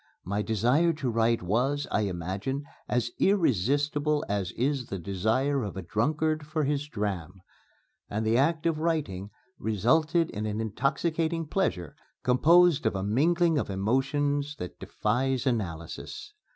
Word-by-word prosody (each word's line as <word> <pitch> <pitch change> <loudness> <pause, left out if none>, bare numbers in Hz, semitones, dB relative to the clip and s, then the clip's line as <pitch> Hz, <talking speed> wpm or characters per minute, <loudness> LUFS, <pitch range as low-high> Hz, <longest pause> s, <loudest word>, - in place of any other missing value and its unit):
My 100 +3 -1
desire 125 +11 +2
to 140 -5 -2
write 115 -2 +2
was, 130 +10 0
I 105 - +2
imagine, 95 - -3 0.3
as 120 -1 0
irresistible 145 - +2
as 100 -3 -1
is 135 0 -1
the 95 - -4
desire 110 - 0
of 100 -4 -5
a 95 - -4
drunkard 155 - 0
for 155 0 -1
his 145 +1 -1
dram. 95 - -4 0.7
And 110 +2 -2
the 110 +1 +2
act 155 +6 +2
of 165 -2 +1
writing 140 - -1 0.3
resulted 155 - +2
in 105 +1 -3
an 105 +1 -2
intoxicating 160 - -1
pleasure 120 - -1 0.3
composed 165 +5 +5
of - - -1
a 95 - -2
mingling 160 - +2
of - - -3
emotions 140 +8 0
that 90 - -8
defies 130 +1 -1
analysis. 90 - -4
130 Hz, 140 wpm, -28 LUFS, 105-150 Hz, 0.7 s, composed